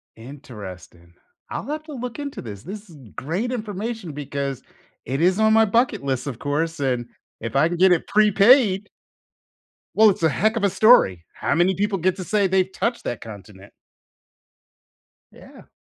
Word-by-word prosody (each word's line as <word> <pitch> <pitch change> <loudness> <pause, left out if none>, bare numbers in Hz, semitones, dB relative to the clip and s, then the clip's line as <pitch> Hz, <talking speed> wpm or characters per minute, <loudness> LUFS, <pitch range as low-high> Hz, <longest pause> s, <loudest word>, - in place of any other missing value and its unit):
Interesting. 105 - -11 0.4
I'll - - -5
have 305 +1 -4
to 310 -1 -10
look 250 0 -6
into 285 -1 -6
this. 100 -4 -9
This 205 - -9
is 160 - -14 0.2
great 185 - -3
information 215 -4 -5
because 140 -2 -4 0.4
it 135 +5 -2
is 185 +4 +3
on 220 0 +4
my 225 0 +5
bucket 230 - +1
list, 130 -1 -2
of 125 -4 -5
course, 160 +3 -2
and 125 -3 -1 0.3
if 115 - -6
I 145 +4 +4
can 175 - -3
get 185 +1 +5
it 175 - +1
prepaid 210 0 +4 1.1
Well, 220 0 +7
it's 190 -3 -2
a 160 - +5
heck 215 +10 +1
of 225 - -2
a 200 - +4
story. 135 - +4
How - - -1
many 175 +3 +3
people 205 +1 -1
get 185 +1 0
to 185 - -5
say 205 +1 +1
they've 190 0 +1
touched 235 +4 -2
that 120 - -4
continent? 100 -2 -12 1.6
Yeah. - - -16
180 Hz, 170 wpm, -22 LUFS, 135-215 Hz, 1.6 s, Well